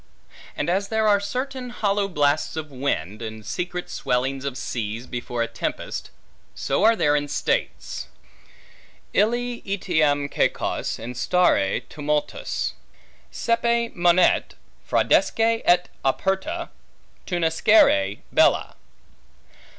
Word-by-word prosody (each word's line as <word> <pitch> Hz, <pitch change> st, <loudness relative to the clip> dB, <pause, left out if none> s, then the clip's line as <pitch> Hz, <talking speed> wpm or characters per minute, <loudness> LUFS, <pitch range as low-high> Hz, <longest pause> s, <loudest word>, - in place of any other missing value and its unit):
And 145 Hz, -, -1 dB
as 195 Hz, +3 st, +1 dB
there 220 Hz, 0 st, +1 dB
are 205 Hz, -1 st, +5 dB
certain 255 Hz, +5 st, -4 dB
hollow 205 Hz, -4 st, 0 dB
blasts 150 Hz, -3 st, +1 dB
of 155 Hz, -2 st, -5 dB
wind, 115 Hz, -, -2 dB
and 110 Hz, -1 st, -7 dB
secret 175 Hz, -, -4 dB
swellings 130 Hz, +2 st, -1 dB
of 135 Hz, -2 st, -3 dB
seas 115 Hz, -3 st, -4 dB
before 120 Hz, -1 st, -3 dB
a -, -, -2 dB
tempest, 115 Hz, -, -4 dB, 0.5 s
so -, -, 0 dB
are 225 Hz, +1 st, +6 dB
there 150 Hz, -7 st, +2 dB
in 145 Hz, 0 st, 0 dB
states: -, -, -2 dB, 1.1 s
Ille 240 Hz, +3 st, +1 dB
etiam 155 Hz, -7 st, +1 dB
caecos -, -, -1 dB
instare 125 Hz, -, +1 dB
tumultus 150 Hz, 0 st, -2 dB, 0.6 s
Saepe 235 Hz, 0 st, 0 dB
monet, 175 Hz, +1 st, +3 dB, 0.3 s
fraudesque -, -, +2 dB, 0.2 s
et 180 Hz, 0 st, +4 dB, 0.2 s
operta 195 Hz, -, -1 dB, 0.6 s
tunescere 160 Hz, -, +3 dB
bella. -, -, +3 dB
165 Hz, 105 wpm, -24 LUFS, 130-205 Hz, 1.1 s, are